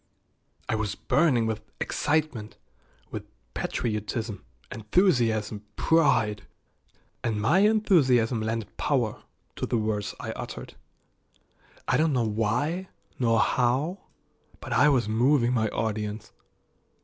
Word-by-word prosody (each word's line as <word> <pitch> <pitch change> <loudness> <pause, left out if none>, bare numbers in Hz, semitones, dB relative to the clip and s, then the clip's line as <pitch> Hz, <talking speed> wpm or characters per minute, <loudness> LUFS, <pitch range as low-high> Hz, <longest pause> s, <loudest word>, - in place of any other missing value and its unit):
I - - -1
was 110 -2 -1
burning 140 -8 +2
with 110 -1 -2 0.2
excitement, 145 -8 -1 0.5
with - - -6 0.3
patriotism, 110 -1 -3 0.3
enthusiasm, 110 - +1
pride, 110 - +2 0.8
and 110 -3 -1
my 130 - +3
enthusiasm 150 - +3
lent 110 -1 -3
power - - 0 0.4
to - - -2
the 120 - 0
words 105 -2 -2
I - - -4
uttered. - - -7 1.1
I 125 - +3
don't 155 -1 +2
know 120 -3 +1
why 125 - -1 0.3
nor 115 -3 +3
how, 135 +9 +1 0.6
but - - -5
I 150 - +5
was 125 -6 +2
moving 120 +3 +3
my 110 -3 +2
audience. 105 -1 -3
115 Hz, 110 wpm, -27 LUFS, 110-145 Hz, 1.1 s, I